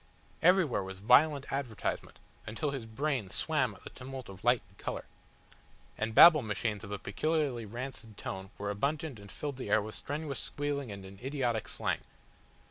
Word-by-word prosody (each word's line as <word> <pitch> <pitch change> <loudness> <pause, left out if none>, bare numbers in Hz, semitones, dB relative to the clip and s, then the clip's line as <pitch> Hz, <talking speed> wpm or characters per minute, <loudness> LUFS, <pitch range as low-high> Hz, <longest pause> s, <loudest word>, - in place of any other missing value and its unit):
Everywhere 175 - +4
was 95 0 -6
violent 140 +7 +4
advertisement, 130 -7 -3 0.3
until 125 +7 -1
his 130 -5 -5
brain 125 -2 -1
swam 130 - +1
at - - -17
the - - -9
tumult 130 -1 -8
of 95 -1 -11
light 120 0 +4
and 95 - -24
colour. - - -4 0.9
And 110 0 -2
Babble 160 -3 +10
Machines 105 -1 -2
of 105 - -7
a 105 - -2
peculiarly 130 +2 -1
rancid 120 -2 -6
tone 95 0 -5
were 100 0 -2
abundant 140 - -1
and 100 -1 -12
filled 145 -3 -4
the 125 - -5
air 105 - +5
with 110 +1 -5
strenuous 145 -1 -4
squealing 145 -4 -2
and 100 -1 -7
an 95 0 -11
idiotic 130 -5 -1
slang. - - -1
125 Hz, 170 wpm, -32 LUFS, 105-145 Hz, 0.9 s, Babble